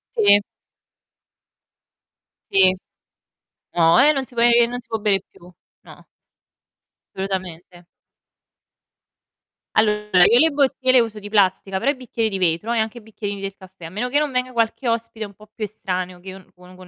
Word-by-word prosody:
Sì. 205 -2 +5 2.1
Sì. 190 -1 +5 1.0
No, 165 -1 +4
eh, 290 +3 +6
non 270 -3 -2
si 250 - -19
può 235 0 +2
ehm 235 0 +4
non 245 0 -5
si - - -33
può 225 -1 -3
bere 205 -2 +1
più. 175 +1 -18 0.3
No. - - -16 1.1
Assolutamente. 185 -2 -6 1.9
Allora, 210 -3 +3
io 240 - +5
le 320 - +5
bottiglie 275 -3 +1
le 255 - +7
uso 225 -2 -2
di 205 0 -9
plastica, 195 -2 +1
però 275 +9 +1
i - - -6
bicchieri 235 -3 -3
di 195 -2 -4
vetro 180 +6 0
e 235 - 0
anche 220 +1 -2
i - - -10
bicchierini 205 -2 -6
del 195 0 -6
caffè. 190 -3 -14
A - - -7
meno 215 +8 -3
che 280 - +1
non 300 -2 -1
venga 255 0 -1
qualche 235 +1 -1
ospite 230 -1 -3
un 200 - -13
po' 215 +2 -17
più 220 - -7
estraneo 185 -3 -4
che 190 +2 -11
io 190 - -9
non 185 - -22
con 180 0 -16
con 185 0 -14
210 Hz, 180 wpm, -21 LUFS, 190-235 Hz, 2.1 s, le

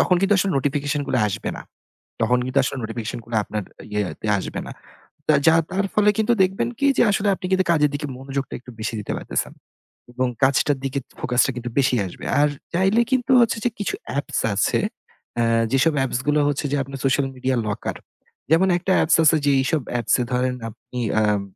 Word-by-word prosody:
তখন 180 - +3
কিন্তু 195 +1 +3
আসলে 195 +1 +1
notification 145 +1 -1
গুলা 125 - +1
আসবে 100 - -3
না। - - -8 0.6
তখন 125 +2 +3
কিন্তু 130 +2 +1
আসলে 130 - -2
notification 115 +1 -4
গুলা 115 -1 -3
আপনার 105 -1 -4 0.3
ইয়েতে 105 +1 -3
আসবে - - -4
না। - - -7 0.6
তা 155 - +5
যা 160 - +7 0.2
তার 195 +2 0
ফলে 210 0 +4
কিন্তু 220 +2 +3
দেখবেন 190 +4 0
কি 280 - +3
যে - - +5
আসলে 200 +1 0
আপনি - - -8
কিন্তু 185 0 +3
কাজের 150 -3 +3
দিকে 145 +1 -4
মনোযোগটা 135 0 -4
একটু 125 +1 -13
বেশি 110 +1 -3
দিতে 105 - -5
পারতেছেন - - -3 0.6
এবং 130 +1 0 0.2
কাজটার 140 +1 +3
দিকে 135 +1 -1 0.2
focus 125 0 +2
টা - - 0
কিন্তু 125 0 -4
বেশি 130 -1 +3
আসবে। 90 - -10 0.2
আর 150 - +4 0.2
চাইলে 195 +6 +3
কিন্তু 255 -1 +1
হচ্ছে 230 0 +2
যে - - +4
কিছু 205 - -2 0.2
apps - - -3
আছে, 100 - +1 0.6
অ্যা 120 - +2 0.3
যেসব 140 +4 +3
apps 125 - -2
গুলা 150 0 +3
হচ্ছে 145 +1 -1
যে - - +1
আপনার 135 0 -8
social 135 +1 +2
media 130 0 -1
locker। 105 - -3 0.6
যেমন 175 +4 +5
একটা 190 +2 -2
apps 160 - +4
আছে 155 +1 +5
যে 145 - +4
এইসব 150 +2 0 0.2
apps 115 - 0
এ - - +1
ধরেন 125 0 +1
আপনি, 120 +2 -9 0.2
আম 105 -2 +2
140 Hz, 200 wpm, -22 LUFS, 125-175 Hz, 0.6 s, যা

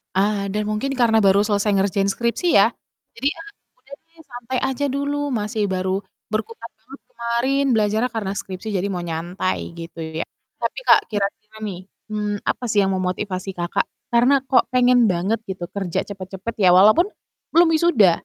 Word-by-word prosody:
Ah, 200 0 +1
dan 210 0 -2
mungkin 215 +6 -1
karena 230 -5 +3
baru 195 +1 +5
selesai 205 0 +1
ngerjain 195 0 +1
skripsi 235 - -2
ya, - - +6 0.5
jadi, 260 +4 -1
"Ah 330 - -10 0.3
udah 275 - -16
deh, 330 0 -28
santai 245 +1 -4
aja 265 +3 -1
dulu 285 +1 -2
masih 215 -2 -1
baru 190 +1 -1 0.2
berkutat 225 +2 -4
banget 265 +5 -13
kemarin 235 +4 0
belajarnya 220 +2 +2
karena 210 -4 -3
skripsi, 190 +3 -6
jadi 190 +1 0
mau 180 - -3
nyantai," 175 +2 -3
gitu 165 0 -9 0.2
ya. - - -1 0.3
Tapi, - - -2
Kak, - - +8
kira-kira 205 +1 -3
nih, 195 -4 -4 0.3
mmm, 210 -1 -2
apa - - -2
sih 205 -2 +3
yang 195 - +1
memotivasi 185 0 -3
Kakak 175 0 -1 0.2
karena 255 +3 +4
kok 260 -1 +3
pengen 250 -2 +4
banget 190 +4 0
gitu 190 -2 -5
kerja 190 -3 -2
cepet-cepet, 190 +3 -6
ya 185 - +5
walaupun 215 - +6 0.5
belum 335 0 +6
wisuda? 310 - +5
210 Hz, 165 wpm, -21 LUFS, 190-245 Hz, 0.5 s, Kak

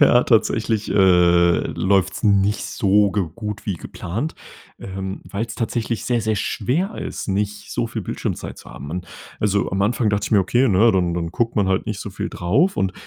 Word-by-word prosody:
Ja, 125 -4 +6
tatsächlich, 110 -1 +1
äh, 90 -2 +5
läuft's 95 0 0
nicht 100 -1 +2
so 100 0 +2
ge 100 -1 0
gut 105 -1 -6
wie 100 - 0
geplant, 110 - -5 0.4
ähm, 95 0 -6
weil's 110 +3 -4
tatsächlich 115 -1 -2
sehr, 120 -1 +1
sehr 110 0 0
schwer 145 - -1
ist, - - -5
nicht 105 +1 -2
so 120 -1 -1
viel 115 -1 -5
Bildschirmzeit - - -4
zu - - -13
haben. 70 +2 -9
Und 90 +2 -4 0.3
also, 100 -1 +1
am 95 - -1
Anfang 110 +1 +1
dachte 100 0 0
ich - - -7
mir: 105 - +6
Okay, 120 +8 +2
ne, 110 +3 +5
dann 90 -3 +1
dann 85 -1 -2
guckt 115 +6 -1
man 100 -3 +2
halt 95 +1 0
nicht 105 -2 -3
so 105 - -6
viel - - -4
drauf 140 - +1
und, 95 -1 0
105 Hz, 195 wpm, -21 LUFS, 95-115 Hz, 0.4 s, Ja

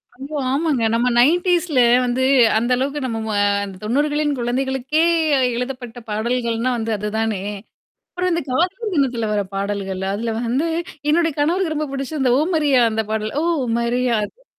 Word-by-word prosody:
அய்யோ! 275 +4 -6
ஆமாங்க. 280 -3 0
நம்ம 235 +2 +2
90ஸ்ல 345 +2 +2 0.3
வந்து 250 +1 0 0.3
அந்த 240 +3 0
அளவுக்கு 280 +3 -2
நம்ம 225 -3 -3
ம - - -2 0.3
அந்த 195 -1 -9
90களின் 295 +5 0
குழந்தைகளுக்கே 265 +5 0 0.5
எழுதப்பட்ட 245 -1 -5
பாடல்கள்ன்னா 235 +2 -1
வந்து 225 0 -3
அது 210 +1 -3
தானே. 220 -4 -1 0.7
அப்புறம் 360 0 -1
இந்த 335 0 0
காதலர் 370 - -1
தினத்துல 245 -6 0
வர 205 - +1
பாடல்கள், 195 -1 -3
அதுல 225 +2 -2
வந்து 255 +7 0 0.4
என்னுடைய 325 0 +2
கணவருக்கு 325 +2 +1
ரொம்ப 305 0 -2
பிடிச்சு 275 +3 -4
இந்த 255 -2 +3
ஓமரியா 300 -5 +2
அந்த 220 0 -1
பாடல். 215 0 -2
ஓ! - - -1 0.4
மரியா 240 +1 +1
அது - - -17
255 Hz, 150 wpm, -20 LUFS, 230-305 Hz, 0.7 s, இந்த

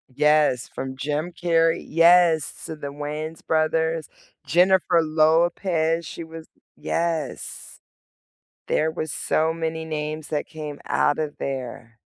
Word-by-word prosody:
Yes, 150 -4 +3
from 130 0 -6
Jim 150 +5 -2
Carrey 165 -1 +1
Yes, 165 -1 +4
to 160 - -5
the 145 -2 -7
Wayans 150 +2 -6
brothers. 160 0 0 0.4
Jennifer 180 0 +4
Lopez, 160 +1 +2
she 170 0 -7
was 160 0 -10 0.3
Yes. 165 -5 -3 0.9
There 160 +1 +1
was 155 -1 -4
so 160 +1 +1
many 160 -1 -3
names 155 0 -4
that 150 -2 -2
came 150 -2 -8
outta 150 0 +1
there. 125 -3 -5
160 Hz, 115 wpm, -24 LUFS, 150-165 Hz, 0.9 s, Yes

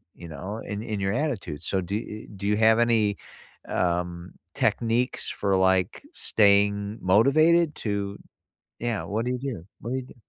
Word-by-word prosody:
you 85 - -10
know, 95 +8 -6
in 105 0 -4
in 110 -3 -3
your 95 0 0
attitude, 115 - -3
so 95 - 0
do 95 +3 -4
e - - +1 0.3
e - - -18
do 100 - -6
you 105 0 +2
have 110 +1 +5
any, 115 -3 +3 0.5
um, 90 0 -1 0.2
techniques 120 +2 +1
for, 100 -1 0
like, 95 - +2
staying 100 0 +2
motivated 155 - +4
to 100 -2 -3 0.6
yeah, 120 -3 -2
what 110 +3 -2
do - - 0
you 125 - -2
do? 125 -10 -5 0.2
What 115 - -6
do - - 0
you 130 - -5
do? - - -15
105 Hz, 175 wpm, -26 LUFS, 95-115 Hz, 0.6 s, have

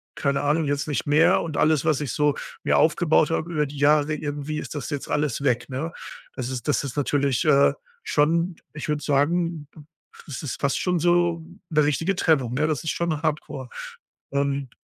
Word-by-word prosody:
keine 140 -1 0
Ahnung, 150 +2 +1
jetzt 145 +1 -1
nicht 145 - -1
mehr 150 +2 +5
und 160 -3 -5
alles, 155 -1 +2
was 155 -3 +2
ich 140 -5 -3
so 150 +2 +1 0.3
mir - - +3
aufgebaut 160 -1 +3
habe 165 +1 -2
über 150 -2 +1
die 145 +1 -9
Jahre, 150 +1 +3
irgendwie 150 0 -4
ist - - -7
das 145 - -4
jetzt 145 -2 -4
alles 145 -3 -1
weg”, 120 -3 0
ne? 145 +6 -4 0.4
Das 130 -2 -4
ist 130 0 -5
das 145 -3 +1
ist 140 -2 -6
natürlich, 140 0 +1
äh, 140 -2 +5 0.3
schon, 165 - +1 0.2
ich 150 0 -6
würde 150 -1 0
sagen, 155 +2 0
b - - -16 0.5
das 145 -1 -6
ist 140 - -4
fast 140 -1 0
schon 180 -2 0
so 175 0 +2 0.3
'ne 155 -2 +3
richtige 165 +7 0
Trennung, 140 -10 +2
ne, 150 +4 +1
das 155 -5 -2
ist 160 - -2
schon 165 -3 -2
Hardcore. 150 -4 -3 0.6
Ähm, 140 -1 -1
150 Hz, 195 wpm, -24 LUFS, 140-160 Hz, 0.6 s, mehr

